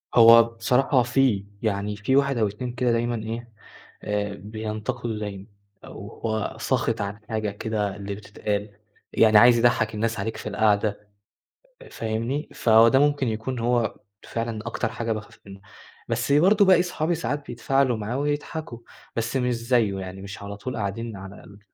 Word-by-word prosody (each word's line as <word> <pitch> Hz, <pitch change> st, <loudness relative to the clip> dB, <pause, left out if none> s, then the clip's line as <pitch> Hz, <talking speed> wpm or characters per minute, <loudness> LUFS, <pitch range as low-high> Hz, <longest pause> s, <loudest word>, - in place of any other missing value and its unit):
هو 115 Hz, 0 st, +9 dB
بصراحة 125 Hz, +3 st, +1 dB
في، 120 Hz, -5 st, +1 dB, 0.2 s
يعني 105 Hz, -1 st, -1 dB
في 105 Hz, +6 st, 0 dB
1 140 Hz, -1 st, +2 dB
أو 110 Hz, -2 st, +2 dB
2 115 Hz, +5 st, -5 dB
كده 125 Hz, 0 st, +1 dB
دايمًا 120 Hz, +1 st, 0 dB
إيه، 115 Hz, +1 st, -6 dB, 0.5 s
آآ 105 Hz, -1 st, -2 dB
بينتقدوا 110 Hz, +3 st, -5 dB
دايمًا، 100 Hz, -2 st, -6 dB, 0.4 s
أو -, -, -9 dB
هو 110 Hz, -1 st, -2 dB
ساخط -, -, 0 dB
عن 100 Hz, +1 st, -4 dB
حاجة 110 Hz, -1 st, -1 dB
كده 105 Hz, -1 st, -2 dB
اللي 100 Hz, 0 st, -5 dB
بتتقال، 105 Hz, 0 st, -4 dB, 0.4 s
يعني 110 Hz, -1 st, +6 dB
عايز 120 Hz, +2 st, +7 dB
يضَحك 115 Hz, -2 st, +2 dB
الناس 115 Hz, +1 st, -1 dB
عليك 110 Hz, +3 st, -3 dB
في -, -, -5 dB
القعدة، 105 Hz, 0 st, +1 dB, 0.7 s
أ -, -, -13 dB
فاهمني؟ 115 Hz, +6 st, -3 dB
فهو 115 Hz, 0 st, +5 dB
ده 130 Hz, +3 st, +4 dB
ممكن 145 Hz, -2 st, +2 dB
يكون 115 Hz, +3 st, -3 dB
هو 120 Hz, -1 st, +1 dB, 0.3 s
فعلًا 115 Hz, -1 st, -4 dB
أكتر -, -, -2 dB
حاجة 115 Hz, 0 st, -3 dB
باخاف 110 Hz, -1 st, -6 dB
منه. 100 Hz, -1 st, -12 dB, 0.5 s
بس -, -, -1 dB
برضه 195 Hz, +8 st, +5 dB
باقي 185 Hz, -2 st, +6 dB
صحابي 175 Hz, -1 st, -1 dB
ساعات 145 Hz, +1 st, -3 dB
بيتفاعلوا 125 Hz, +1 st, +1 dB
معاه 110 Hz, +4 st, -3 dB
ويضحكوا، 145 Hz, -2 st, -3 dB, 0.4 s
بس 115 Hz, +2 st, -2 dB
مش 125 Hz, -1 st, 0 dB
زيه، 115 Hz, -4 st, +1 dB
يعني 95 Hz, 0 st, -7 dB
مش 100 Hz, +1 st, -8 dB
على 100 Hz, 0 st, -7 dB
طول 125 Hz, +5 st, -5 dB
قاعدين 110 Hz, +1 st, -4 dB
على 95 Hz, +1 st, -10 dB
ال 100 Hz, 0 st, -15 dB
115 Hz, 165 wpm, -24 LUFS, 105-125 Hz, 0.7 s, هو